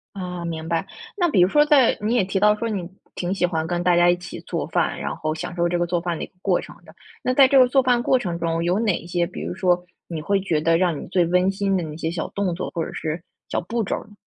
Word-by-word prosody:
啊， 180 -2 -5
明 160 -1 -4
白， 165 -1 -1 0.3
那 350 -4 +2
比 190 - +3
如 180 - +6
说 295 +7 +4
在 290 -5 +4
你 215 +3 0
也 220 - +3
提 190 +1 -1
到 210 0 +5
说 230 +1 -3
你 190 -5 -3 0.3
挺 180 +2 -2
喜 185 - -1
欢 160 -2 -2
跟 175 +1 -1
大 175 -1 +3
家 175 0 +5
一 175 - +2
起 175 0 -9
做 - - -4
饭， - - 0
然 - - -3
后 155 0 -2
享 170 +2 -6
受 175 0 +1
这 175 0 0
个 175 - +1
做 175 0 0
饭 170 -1 -2
的 - - -3
一 - - -8
个 - - -32
过 185 -3 +2
程 - - -11
的。 - - -16 0.3
那 255 - +1
在 270 -1 +7
这 275 - +5
个 255 - +7
做 270 +1 +3
饭 245 -1 +2
过 260 +1 +3
程 175 -8 -3
中 165 0 -1
有 180 +4 +1
哪 205 -6 0
些， 175 -1 0
比 180 - -8
如 - - -4
说 180 -1 +1 0.2
你 165 -3 -4
会 195 +5 +1
觉 160 -5 0
得 165 +1 +3
让 175 -5 +1
你 - - -8
最 180 0 +2
温 180 +2 +2
馨 195 0 0
的 180 - -1
那 155 -1 -6
些 160 0 -2
小 170 -1 -3
动 195 -4 -1
作 - - -4
或 165 -2 -2
者 - - -8
是 160 +1 -4 0.3
小 - - -1
步 225 +6 -2
骤 - - -1
儿 - - -8
呢？ 210 - -17
180 Hz, 320 characters per minute, -23 LUFS, 170-200 Hz, 0.3 s, 在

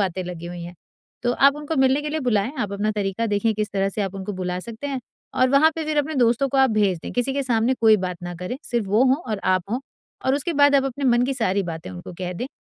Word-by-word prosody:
बातें 185 -1 -1
लगी 175 -1 -7
हुई 175 0 -7
हैं। 175 +1 -8 0.5
तो 245 0 +1
आप 275 +3 +4
उनको 300 +2 -4
मिलने 265 +1 +3
के 300 - -3
लिए 315 0 -2
बुलाएँ। 235 -1 +1
आप 205 -3 -2
अपना 205 +2 0
तरीका 205 +2 -1
देखें 210 +1 +1
किस 210 0 -1
तरह 195 0 +1
से 205 +1 -2
आप 195 0 -3
उनको 195 +1 -5
बुला 180 -1 -3
सकते 235 +6 -7
हैं 270 -2 -3 0.4
और 255 - +5
वहाँ 290 +4 +5
पे 320 -1 -3
फिर 305 0 -2
अपने 305 +2 0
दोस्तों 245 +2 +2
को 275 - -2
आप 265 -2 +5
भेज 200 -5 +2
दें। - - -6
किसी 245 +2 0
के 280 0 -1
सामने 240 0 +1
कोई 220 -1 +6
बात 180 -1 -4
ना 175 0 -5
करें, 180 +9 -5
सिर्फ 235 -4 -1
वो 210 +6 +3
हों 260 +1 +4 0.2
और 210 - -1
आप 185 -1 +2
हों 245 +3 -1 0.5
और 265 - +3
उसके 290 +4 -1
बाद 285 -1 +5
आप 270 -1 +4
अपने 270 +1 -3
मन 240 -1 +4
की 270 +1 -1
सारी 200 -5 +1
बातें 160 - -6
उनको 90 - -9
कह 180 -1 -3
दें 245 +9 -4
230 Hz, 275 wpm, -23 LUFS, 195-270 Hz, 0.5 s, कोई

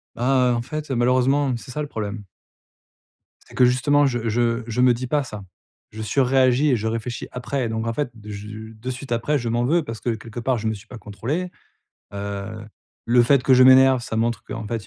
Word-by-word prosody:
Ah, 125 +1 +2
heu, - - +2
en 120 - -1
fait, 150 +4 -6
heu, - - 0
malheureusement, 130 +2 +2
c'est 125 +2 -11
ça, 150 - -3
le 145 - -3
problème. 105 -3 -5 1.2
C'est - - -17
que, 125 - +5
justement, 145 +4 +3
je 120 -3 -1
je 115 +1 0
je 120 +2 -1
me 125 -1 +5
dis 125 +2 -5
pas 145 +3 +1
ça. 105 -6 -8 0.5
Je 110 - -7
surréagis 130 +4 +3
et - - +4
je 110 -1 -2
réfléchis 115 +1 -4
après, 125 0 -3
donc 110 0 -3
en 115 - -1
fait 145 -1 -2
de 105 -1 -12
je 105 +2 -8
de 110 +4 -7
suite 130 +1 -7
après, 120 +6 +1
je 120 -3 -3
m'en 120 +1 0
veux 165 +4 +2
parce 115 -6 -7
que, 120 - -1
quelque 115 +1 -7
part, 125 +1 0
je 110 0 -3
me 110 - 0
suis 110 +1 -11
pas 125 - -10
contrôlé. 115 - -4 0.6
Heu, 100 +2 -6 0.4
le 120 +1 +5
fait 130 +2 +3
que 130 - +3
je 130 - +6
m'énerve, 130 0 +7
ça 110 - -4
montre 115 +1 0
qu'en 115 -2 -6
fait, 115 -1 -4
120 Hz, 225 wpm, -22 LUFS, 110-130 Hz, 1.2 s, m'énerve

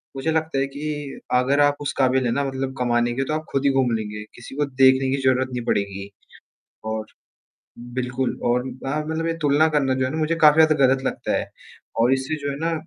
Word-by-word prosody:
मुझे 135 +4 -1
लगता 160 -2 -1
है 135 - +1
कि 145 0 -6
अगर 130 +3 +3
आप 145 0 +4
उस 145 - -2
काबिल 130 -1 +2
है 120 - +1
ना, 140 +4 0
मतलब 135 0 -3
कमाने 120 -1 +1
के 135 +3 -1
तो 155 - -2
आप 155 0 -3
ख़ुद 135 - 0
ही - - +5
घूम 135 -2 +2
लेंगे, 105 -1 -5
किसी 120 +2 -11
को 145 +1 +1
देखने 130 -1 +4
की 140 - -3
ज़रूरत 130 0 +2
नहीं 120 -1 -3
पड़ेगी। 100 -2 -2 0.8
और 110 0 -4 0.9
बिल्कुल 125 +1 -2
और 120 +1 +2 0.2
हाँ, 150 +3 -1
मतलब 160 +1 -2
ये 165 - 0
तुलना 145 +1 +4
करना 135 -3 +2
जो 130 0 0
है 130 - -2
ना 155 - -3
मुझे 160 +1 0
काफ़ी 155 +1 +7
ज़्यादा 155 0 +3
ग़लत 130 0 +2
लगता - - -1
है, - - -4 0.5
और 120 +3 +3
इससे 135 +3 -1
जो 145 - -1
है 140 - -5
ना, 165 +1 0
135 Hz, 225 wpm, -23 LUFS, 125-145 Hz, 0.9 s, काफ़ी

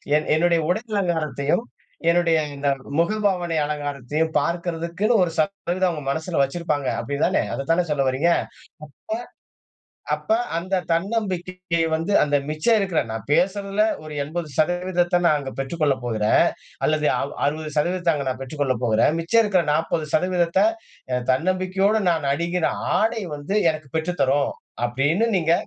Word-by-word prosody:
என் 155 - +1
என்னுடைய 170 +1 +3
உடல் 215 +5 -1
அலங்காரத்தையும், 160 +1 0 0.5
என்னுடைய 170 -2 +3 0.2
இந்த 140 0 -3 0.3
முகபாவனை 180 -3 +1
அலங்காரத்தையும் 145 +1 -2
பார்க்கறதுக்குன்னு 170 +5 -1
ஒரு 165 - -1
சதவீதம் 185 +2 0
அவங்க 150 -3 -6
மனசில 160 +3 -1
வச்சிருப்பாங்க. 145 -1 -1
அப்படிதானே, 140 +1 0
அதை 135 - -3
தானே 180 +2 +3
சொல்ல 140 -2 +1
வர்றீங்க. 150 +7 +2
அப்ப - - -11 1.7
அப்ப 330 - +3 0.2
அந்த 185 +3 -1
தன்னம்பிக்கை 185 -2 -1
வந்து 165 +5 -1
அந்த 145 -1 +2
மிச்சம் 155 +10 +2
இருக்கிற, 190 -4 +1
நான் 110 -2 -5
பேசுறதுல 200 +4 +1 0.2
ஒரு 155 - -8
80% 175 +3 0
நான் 155 - +4
அங்க 135 -2 -5
பெற்றுக் 135 +5 -4
கொள்ளப் 140 -4 +2
போகிறேன். 110 -3 +3 0.4
அல்லது 155 -1 +1
அ - - -1 0.3
60% 155 +4 0
அங்க 140 -2 -3
நான் 130 0 -3
பெற்றுக் 140 +3 -8
கொள்ளப் 130 -3 0
போகிறேன். 115 +5 +3
மிச்சம் 230 +8 +3
இருக்கிற 190 -4 +2
40% 170 - +1 0.6
தன்னம்பிக்கையோடு 185 +7 +1
நான் 160 -4 0
அணிகிற 170 +2 -1 0.3
ஆடை 225 +1 +1
வந்து 145 +8 -3
எனக்கு 155 -3 -7
பெற்றுத் 175 +3 -2
தரும். 140 +1 +2 0.3
அப்படின்னு 145 - +1
நீங்க 165 -2 +2
165 Hz, 135 wpm, -23 LUFS, 150-185 Hz, 1.7 s, நான்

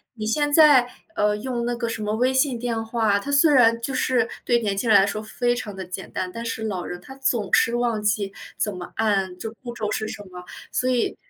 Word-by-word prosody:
你 215 -2 -5
现 290 +7 +1
在， 290 -5 +6 0.3
呃， 210 0 +2
用 240 +1 -3
那 240 0 -1
个 235 -1 -3
什 225 -1 -4
么 210 0 -1
微 250 +3 +2
信 260 -2 +2
电 230 -1 -2
话， 220 -3 +1
它 280 +8 -5
虽 290 +2 +5
然 230 -3 +5
就 265 +3 -3
是 250 -3 +1 0.2
对 240 -1 +3
年 205 -3 -1
轻 225 +3 -1
人 205 - +8
来 195 - +4
说 210 +1 -3
非 240 +3 -1
常 210 -5 -6
地 190 -1 -6
简 185 +1 -7
单， 185 -1 -3
但 230 - -5
是 230 -1 -4
老 190 -5 -3
人 180 - -6
他 265 - -12
总 240 -6 -1
是 235 - +4
忘 235 -3 0
记 200 -1 0 0.2
怎 210 -2 -1
么 180 -1 -8
按， 195 -4 0
就 220 +4 -6
步 245 -2 -6
骤 210 -2 -3
是 215 - -2
什 205 - -7
么， 180 0 -9 0.3
所 255 - 0
以 245 -2 0
225 Hz, 260 characters per minute, -23 LUFS, 205-245 Hz, 0.3 s, 人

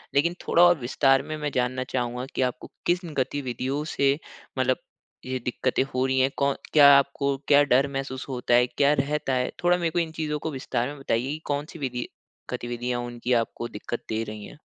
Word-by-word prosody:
लेकिन 165 +5 +3
थोड़ा 175 - +5
और 175 -1 +6
विस्तार 135 +2 +3
में 155 - -5
मैं 150 -1 -3
जानना 130 +1 0
चाहूँगा 125 0 -2
कि - - 0
आपको 125 0 -2 0.2
किन 175 -2 0
गतिविधियों 130 +1 -2
से 140 +1 +2 0.4
मतलब 130 0 +2 0.5
ये 130 0 -2
दिक्कतें 125 +1 0
हो 130 +1 +1
रही 130 0 +1
हैं 130 +1 +4
कौन 140 -1 +2 0.2
क्या 145 -2 +9
आपको 140 0 +1
क्या 145 0 +6
डर 135 0 +3
महसूस 135 -1 -4
होता 125 -2 -1
है? 125 +1 +5
क्या 140 +3 +2
रहता 145 -1 -1
है? 125 0 0
थोड़ा 175 0 +4
मेरे 170 -2 0
को 175 - 0
इन 165 -1 -1
चीज़ों 155 -2 -3
को 160 - -4
विस्तार 130 -3 -2
में 145 0 -7
बताइए 130 0 -1
कि 155 - -4
कौन 145 0 -1
सी 165 - -11
विधि 125 -3 -3 0.4
गतिविधियाँ 120 0 -3
उनकी 120 +1 -2
आपको 120 0 -1
दिक्कत 120 +3 -6
दे 110 0 -1
रही 105 -1 -7
हैं? - - -12
135 Hz, 205 wpm, -26 LUFS, 125-145 Hz, 0.5 s, क्या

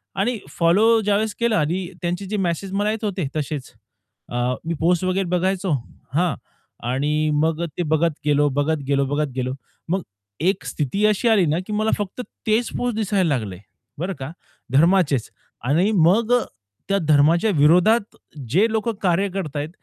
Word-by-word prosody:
आणि 220 +5 0
फॉलो 215 +7 +3
ज्यावेळेस 210 +1 +1
केला 235 -5 +2
आणि 175 +4 -1
त्यांचे 175 +3 -2
जे 210 +2 -3
मेसेज 185 +1 -2
मला 205 +2 +1
येत 220 0 -5
होते 190 -7 -2
तसेच, 145 -2 -4 0.6
अ, 120 - -6 0.3
मी 165 - -1
पोस्ट 175 +2 +2
वगैरे 185 +1 0
बघायचो 185 0 0 0.4
हां, 170 -6 +2 0.5
आणि 150 +4 0
मग 160 +2 +1
ते 175 - 0
बघत 160 +1 +2
गेलो, 145 0 +3
बघत 145 +2 0
गेलो 140 -1 +2
बघत 145 0 -1
गेलो. 130 0 -2 0.4
मग 190 +1 0 0.4
एक 190 +4 +1
स्थिती 180 +8 -1
अशी 215 +3 +2
आली 200 -6 +4
ना 155 +3 +1
की 210 - -4
मला 215 +1 +1
फक्त 205 +4 -4 0.3
तेच 225 +2 +2
पोस्ट 245 -3 -1
दिसायला 200 -4 +1
लागले 100 -6 -5 0.4
बरं 185 +3 -2
का 135 +4 -5 0.4
धर्माचेच 155 - +3 0.4
आणि 180 +9 +3
मग 195 +8 +3
अ, 245 - +5 0.5
त्या 200 - +3
धर्माच्या 160 +8 +4
विरोधात 180 +9 +4 0.3
जे 190 - +4
लोक 225 +1 0
कार्य 190 +2 +2
करताहेत 155 -5 -4
180 Hz, 160 wpm, -22 LUFS, 150-205 Hz, 0.6 s, अ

